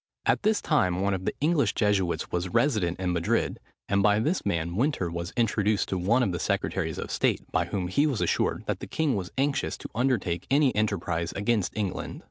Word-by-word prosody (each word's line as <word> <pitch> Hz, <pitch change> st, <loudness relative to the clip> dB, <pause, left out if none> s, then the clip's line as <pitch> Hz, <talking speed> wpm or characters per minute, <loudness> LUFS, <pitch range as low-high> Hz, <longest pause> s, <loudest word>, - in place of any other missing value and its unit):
At -, -, +2 dB
this 215 Hz, +1 st, +1 dB
time 95 Hz, -, +2 dB
one 100 Hz, 0 st, +1 dB
of 95 Hz, -1 st, -3 dB
the -, -, 0 dB
English 155 Hz, -1 st, +2 dB
Jesuits 100 Hz, -5 st, 0 dB
was 90 Hz, +1 st, -1 dB
resident 95 Hz, -, +1 dB
in 90 Hz, -1 st, 0 dB
Madrid; 85 Hz, -1 st, 0 dB, 0.3 s
and 100 Hz, 0 st, +2 dB
by 105 Hz, 0 st, +4 dB
this 155 Hz, +11 st, 0 dB
man 85 Hz, -3 st, -1 dB
Winter 115 Hz, -, 0 dB
was 85 Hz, +2 st, -4 dB
introduced 110 Hz, -3 st, +1 dB
to 95 Hz, -, -1 dB
one 115 Hz, +8 st, +3 dB
of 100 Hz, -, 0 dB
the 85 Hz, -, -3 dB
secretaries -, -, -1 dB
of -, -, -5 dB
state, -, -, +1 dB
by 85 Hz, -, +1 dB
whom 90 Hz, +1 st, -3 dB
he 140 Hz, +12 st, +2 dB
was 135 Hz, -7 st, -1 dB
assured -, -, 0 dB
that -, -, -2 dB
the -, -, -7 dB
king 155 Hz, -6 st, 0 dB
was 90 Hz, -3 st, -4 dB
anxious 140 Hz, +1 st, 0 dB
to -, -, -8 dB
undertake 110 Hz, -8 st, 0 dB
any 140 Hz, -1 st, +3 dB
enterprise 90 Hz, -6 st, -1 dB
against 105 Hz, -1 st, 0 dB
England. 100 Hz, -4 st, -3 dB
100 Hz, 205 wpm, -27 LUFS, 90-125 Hz, 0.3 s, by